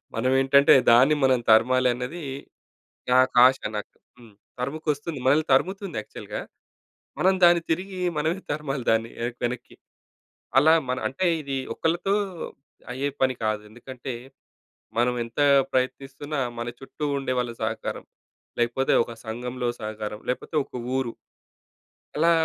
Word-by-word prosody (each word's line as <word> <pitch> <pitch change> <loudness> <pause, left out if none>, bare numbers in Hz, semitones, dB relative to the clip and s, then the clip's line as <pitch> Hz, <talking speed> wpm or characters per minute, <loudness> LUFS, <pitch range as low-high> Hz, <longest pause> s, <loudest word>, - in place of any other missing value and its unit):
మనమేంటంటే 135 +4 +4 0.2
దాన్ని 130 +6 +6
మనం 130 -2 +4
తరమాలన్నది 125 +6 +3 0.9
నాకాశ 130 0 +6 0.2
నాకు. 105 - -7 0.6
తరుముకొస్తుంది. 150 +2 -3
మనల్ని 145 +4 +4
తరుముతుంది 190 - +1
యాక్చువల్‌గా. 105 - -7 0.8
మనం 190 +2 +4
దాన్ని 175 0 +7
తిరిగి 185 +2 -2 0.2
మనమే 160 +5 0
తరమాలి 140 -3 -3
దాన్ని 115 0 +1
వెన 120 +1 -2
వెనక్కి. 120 0 -4 0.8
అలా 155 +4 +7 0.2
మన 125 - 0
అంటే 140 +8 -2 0.2
ఇది 140 -2 -3 0.2
ఒక్కళ్ళతో 175 +4 0 0.8
అయ్యే 135 +3 -1
పని 130 0 +3
కాదు. 110 -1 0
ఎందుకంటే 125 +2 -8 0.9
మనం 125 +1 +2
ఎంత 115 +4 -8 0.3
ప్రయత్నిస్తున్నా, 135 +3 -2 0.2
మన 120 - -3
చుట్టూ 140 +3 -6
ఉండే 135 -2 -2
వాళ్ళ 120 -1 -2
సహకారం, 110 0 -3 0.5
లేకపోతే 120 +3 +1
ఒక 120 - -10
సంఘంలో 125 +2 -3
సహకారం, 110 -1 -5
లేకపోతే 130 +5 -3
ఒక - - -32 0.2
ఊరు 125 -3 -2 1.0
ఎలా 165 +2 +4
130 Hz, 115 wpm, -25 LUFS, 120-150 Hz, 1.0 s, దాన్ని